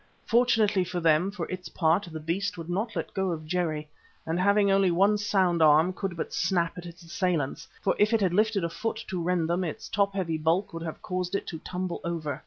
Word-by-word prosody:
Fortunately 220 -5 +3
for 180 0 -3
them, 165 +2 +3
for 190 -4 -4
its 185 -2 -6
part, 170 +4 +1
the 160 - -5
beast 180 +5 -2
would 165 +1 -6
not 210 +5 -2
let - - -4
go 190 -1 0
of 160 -3 -4
Jerry, 155 -3 -1 0.4
and 165 +2 -1
having 200 +1 +4
only 195 -1 +4
one 195 +5 +3
sound 190 -4 +1
arm, 155 +4 +5
could 185 -2 -4
but - - -4
snap 170 -3 0
at 175 -1 -8
its 170 +1 -12
assailants, 165 -4 -2 0.2
for 195 - +2
if 210 +2 +4
it 225 - +3
had 185 -3 +2
lifted 210 -1 +2
a 170 - 0
foot 225 +5 -4
to 185 -2 -2
rend 170 -1 0
them, 175 +2 0
its 165 - -5
top 200 -1 0
heavy 165 -5 -1
bulk 165 +6 +1
would 165 - -5
have 165 -1 -6
caused 180 0 -2
it - - -2
to 160 - -6
tumble 180 0 -4
over. 165 -4 -3
180 Hz, 225 wpm, -27 LUFS, 165-195 Hz, 0.4 s, arm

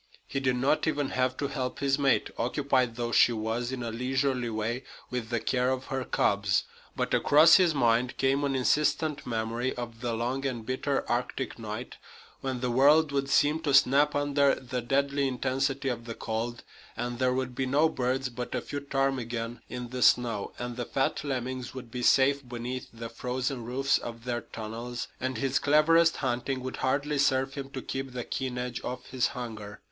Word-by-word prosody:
He 135 - -3
did 130 -2 +1
not 135 +6 +1
even 145 -3 0
have 130 0 0
to 140 - -1
help 130 -2 -3
his 140 0 +1
mate, 135 -2 +2
occupied 130 -1 +1
though 120 0 -2
she 120 - +6
was, 115 +2 -2
in 130 -2 -4
a 115 - -3
leisurely 130 +1 0
way, 115 +3 -2 0.3
with 125 -3 -3
the 120 -1 0
care 125 +2 +1
of 130 0 -2
her 130 -1 -1
cubs. 100 -4 +1 0.3
But - - -1
across 155 +3 +7
his 175 -5 +3
mind 120 -1 +2
came 135 +1 +2
an 140 -1 0
insistent 150 +3 +1
memory 115 +2 -2
of 120 -2 -7
the 120 -2 -1
long 125 +4 -2
and 125 -5 -3
bitter 130 +2 -1
Arctic 125 +1 -2
night, 110 +2 -6 0.4
when 130 -2 -3
the 125 -1 0
world 145 +4 +5
would 140 -1 -1
seem 150 +3 +3
to 145 -4 +1
snap 140 +2 +5
under 145 -1 +3
the 125 -1 -4
deadly 140 +3 +1
intensity 135 +2 -1
of 120 -2 -4
the 115 -1 -6
cold, 115 +2 -3 0.3
and 120 0 -3
there 125 -1 +2
would 130 -1 -2
be 130 +1 -2
no 145 +5 +4
birds 130 -2 -1
but 125 +1 -5
a 125 - -1
few 145 - -5
ptarmigan 125 -4 -2
in 125 +1 -5
the 125 0 -5
snow, 115 -6 +3
and 120 0 -5
the 120 - -2
fat 135 +3 -1
lemmings 130 -2 -3
would 125 -3 -8
be 125 - -4
safe 140 +3 +4
beneath 125 +1 -5
the 115 0 -7
frozen 125 +2 -3
roofs 135 +3 +1
of 115 -1 -8
their 120 -1 -2
tunnels, 115 +3 -6
and 130 +1 -2
his 135 -1 +1
cleverest 160 +3 +4
hunting 130 +1 -1
would 130 - -5
hardly 140 +2 0
serve 135 -1 +2
him 140 -1 -6
to 135 -2 -6
keep 135 -1 -4
the 125 -1 -3
keen 130 0 -3
edge 125 -1 -4
off 125 0 -5
his 130 -2 +2
hunger. 110 -4 -6
130 Hz, 190 wpm, -28 LUFS, 120-135 Hz, 0.4 s, across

